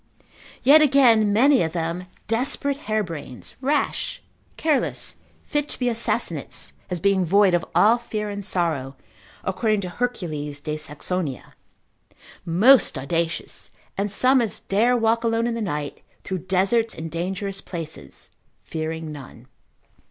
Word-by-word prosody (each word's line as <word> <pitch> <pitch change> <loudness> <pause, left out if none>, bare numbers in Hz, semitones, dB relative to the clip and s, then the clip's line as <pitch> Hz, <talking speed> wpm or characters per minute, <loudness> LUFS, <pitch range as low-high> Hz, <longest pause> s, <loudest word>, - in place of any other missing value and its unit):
Yet 290 +5 +8
again, 250 -7 +5
many 260 +6 +5
of 160 -1 -1
them 170 +1 -3 0.2
desperate 275 +5 0
harebrains, 170 - -4
rash, 285 +3 0 0.4
careless, 310 -4 0 0.3
fit 295 -1 -1
to - - -1
be 250 -1 0
assassinates, 230 0 -1 0.2
as 180 -2 -2
being 195 +1 +2
void 195 +2 +4
of 175 -1 +2
all 215 +7 +5
fear 215 -3 -4
and 205 0 -5
sorrow, 160 -8 -1 0.5
according 215 +1 0
to 180 - -5
Hercules 160 -11 -3
de 150 +1 -4
Saxonia, 155 -1 -5 0.9
Most 210 - +5
audacious, 165 +5 -2 0.3
and 200 +1 -2
such 255 +5 +4
as 225 -4 -2
dare 235 +5 +2
walk 230 0 +2
alone 230 0 +1
in 240 - 0
the 230 - -3
night, 150 -8 -4 0.2
through 185 -1 -5
deserts 200 +5 +2
and 160 0 -6
dangerous 195 +3 -3
places, 160 - -8 0.3
fearing 160 0 -4
none. 130 -4 -11
195 Hz, 130 wpm, -23 LUFS, 165-230 Hz, 0.9 s, Yet